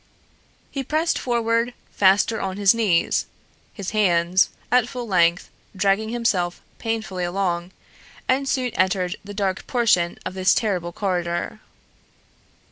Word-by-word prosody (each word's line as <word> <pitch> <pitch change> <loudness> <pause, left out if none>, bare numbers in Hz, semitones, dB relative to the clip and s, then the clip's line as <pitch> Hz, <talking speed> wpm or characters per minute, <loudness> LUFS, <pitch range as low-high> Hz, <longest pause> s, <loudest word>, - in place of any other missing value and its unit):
He 275 - -3
pressed 310 +5 0
forward 235 0 0 0.2
faster 200 +3 +3
on 190 0 -3
his 200 0 +5
knees, 210 -8 +1 0.4
his 200 -4 -6
hands, 185 -3 +3 0.2
at 245 -1 +4
full 245 -2 -5
length, 175 -3 +2 0.2
dragging 200 +3 +1
himself 200 -7 0 0.2
painfully 220 -5 -3
along, 175 -1 -1 0.6
and 270 +1 +1
soon 255 -3 0
entered 185 -1 0
the 205 0 -9
dark 195 -2 -2
portion 215 -9 +2
of - - -4
this 185 0 +3
terrible 185 -6 -1
corridor. 175 -2 -2
195 Hz, 125 wpm, -23 LUFS, 180-230 Hz, 0.6 s, his